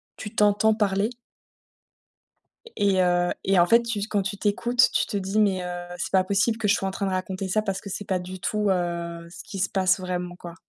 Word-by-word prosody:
tu 210 - -8
t'entends 210 +1 +3
parler? 205 0 +1 1.7
Et 200 -2 +2
et 185 - +3
heu 175 0 +2
et 195 0 +3
en 175 - +6
fait, 230 +5 +4
tu 230 -3 -3
quand 205 -2 +1
tu 195 +1 -4
t'écoutes, 240 +5 +2
tu - - +2
te 205 - -3
dis: 195 +2 -1
«Mais 190 -3 +2
heu, 175 0 -5
c'est - - -4
pas 190 -1 +4
possible 205 +4 +1
que 215 -2 -1
je 205 - +5
sois 195 - -2
en 190 - -2
train 200 - -3
de 190 - -1
raconter 185 +1 -3
ça 215 +4 +1
parce 195 -2 -3
que 200 - -8
c'est 205 +2 -5
pas 185 -1 0
du 185 +1 -8
tout, 210 +2 0
heu, 170 -2 -2
ce 175 - -10
qui 200 -4 -7
se 195 - +1
passe 185 -1 +2
vraiment, 180 -1 -4
quoi». 175 -1 -10
195 Hz, 235 wpm, -25 LUFS, 180-210 Hz, 1.7 s, en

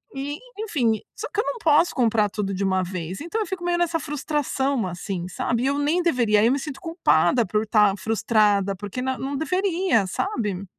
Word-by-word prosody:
E, 285 +2 -4 0.2
enfim, 250 - 0 0.2
só - - -5
que 425 - -1
eu - - +3
não - - -3
posso 325 -3 +3
comprar 225 -4 +2
tudo 195 -1 -3
de 195 +1 -2
uma 190 -1 +1
vez, 180 0 -5
então 345 +8 -3
eu - - -2
fico 375 -2 -5
meio 350 0 0
nessa 335 -1 +1
frustração 280 -4 -1
assim, 180 0 -4
sabe. 235 +6 -1
E - - +1
eu 280 +1 +1
nem 325 +5 +1
deveria, 235 -10 +3
aí 230 +4 +4
me 275 - +1
sinto 295 +2 -6
culpada 255 - +2
por 210 +2 0
estar 210 -2 +3
frustrada, 205 -2 +2
porque 205 +5 -6
n 260 0 -2
não 275 +1 -4
deveria, 360 - +1
sabe. 205 - -2
250 Hz, 200 wpm, -24 LUFS, 205-320 Hz, 0.2 s, aí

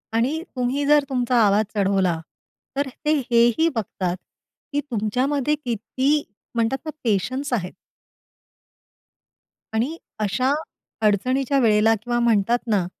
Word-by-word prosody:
आणि 265 +8 +1
तुम्ही 255 +3 0
जर 295 0 +5
तुमचा 250 -2 0
आवाज 205 +2 +3
चढवला 190 -4 +2 0.6
तर 280 0 +1 0.2
ते 305 - +3 0.2
हेही 235 +7 +4
बघतात 185 -4 -2 0.6
की 290 - +1
तुमच्यामध्ये 255 +7 0
किती 265 +3 -1 0.3
म्हणतात 230 +3 +1
ना - - -3
पेशन्स 255 +6 0
आहेत? 185 -6 -2 2.0
आणि 255 +9 -1 0.2
अशा 255 +6 +1 0.5
अडचणीच्या 255 +7 +2
वेळेला 220 -2 +4
किंवा 240 0 0
म्हणतात 235 -1 +3
ना, 205 -5 +2
240 Hz, 110 wpm, -23 LUFS, 210-275 Hz, 2.0 s, जर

